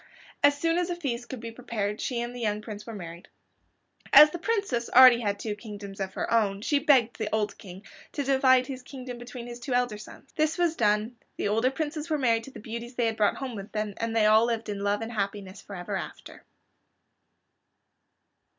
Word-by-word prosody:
As 285 0 +5
soon 330 +2 +1
as 355 0 -1
a 350 - -1
feast 250 -8 -4
could 260 - -6
be 230 0 -7
prepared, 220 -4 -4
she 240 -2 -2
and 240 +1 -4
the 245 - -8
young 210 -2 -1
Prince 210 -1 -8
were 225 - -6
married. 170 -2 -9 0.8
As 300 0 +9
the 345 - -5
Princess 395 - -1
had - - +7
already 240 -5 +7
two 210 +1 -4
kingdoms 205 -2 -9
of 190 -1 -4
her - - -2
own 200 -3 +2
she 290 +3 +2
begged 265 -6 +3
the 215 -1 -2
old 210 -1 0
King 190 -1 -11 0.3
to 285 - -2
divide 260 -1 +4
his 260 -1 -7
kingdom 250 -2 -8
between 240 0 -8
his 240 0 -8
two 245 +1 -2
elder 245 -4 0
sons. 210 - -13
This 310 0 +1
was 345 -2 +1
done, 215 +1 +1 0.2
the - - -1
older 225 +5 +2
princes 305 +3 -4
were 310 - +1
married 230 -4 +1
to 270 - -11
the - - -10
beauties 235 +3 -7
they 240 - +1
had 225 -1 0
brought 210 -2 +2
home 265 -2 -5
with 200 0 -8
them, 215 -1 -2
and 230 0 -3
they 220 -2 +4
all 215 +2 +6
lived 230 -2 -2
in 205 -1 -3
love 205 +1 0
and 225 - -6
happiness 200 -2 -4
forever 180 -3 -6
after. - - -8
235 Hz, 215 wpm, -27 LUFS, 210-260 Hz, 0.8 s, As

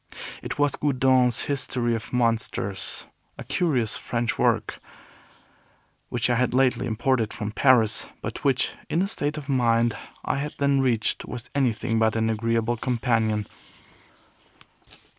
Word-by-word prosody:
It - - -5
was 145 -1 +2
Goudon's 130 -4 +2
History 125 -4 -1
of 110 -3 -5
Monsters, 115 -4 -1 0.3
a - - -7
curious 130 -11 0
French 120 -1 -2
work, - - +1 1.3
which 120 -1 0
I 125 - +2
had 125 0 +1
lately 130 -1 +2
imported 115 0 0
from 105 0 -4
Paris, 115 -3 +3 0.2
but - - -5
which, 135 -3 +2 0.2
in - - 0
the 190 +3 +2
state 150 -7 -1
of 145 -2 -7
mind 120 -4 +2 0.3
I - - 0
had 145 +2 -4
then 140 -1 +2
reached, 120 -4 0
was 125 0 -7
anything 120 -4 0
but 110 0 +2
an 115 0 +1
agreeable 115 +1 0
companion. 115 -3 0
120 Hz, 135 wpm, -25 LUFS, 115-135 Hz, 1.3 s, Paris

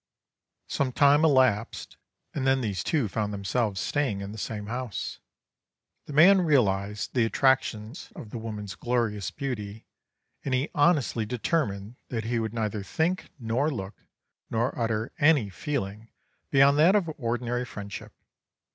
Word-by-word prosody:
"Some 135 -2 -1
time 145 +3 +5
elapsed, 130 -8 +2 0.4
and 135 -2 -1
then 135 0 +3
these 100 -7 -2
two 145 -8 +1
found 105 +2 -2
themselves 100 0 -1
staying 130 -8 -1
in 100 0 -6
the 110 - -8
same 105 0 -4
house. 120 0 -4 0.9
The 150 - -7
man 185 +6 +7
realised 105 - +1
the 125 - +3
attractions 125 0 0
of 105 - -9
the 120 - -5
woman's 105 -3 -6
glorious 110 -4 -1
beauty, 110 -6 -5 0.6
and 130 - 0
he 130 +4 -1
honestly 145 -8 +2
determined 120 -4 -2
that 115 -3 -2
he 115 +1 -1
would 110 -1 -2
neither 110 -2 -2
think, 165 - -1
nor 125 +4 0
look, 100 -8 -5 0.6
nor 115 +3 0
utter 115 0 -1
any 145 -9 +4
feeling 105 - -4 0.4
beyond 140 +1 +5
that 175 +6 +6
of 180 -6 +1
ordinary 120 0 -1
friendship. 100 -4 -8
120 Hz, 140 wpm, -27 LUFS, 105-140 Hz, 0.9 s, man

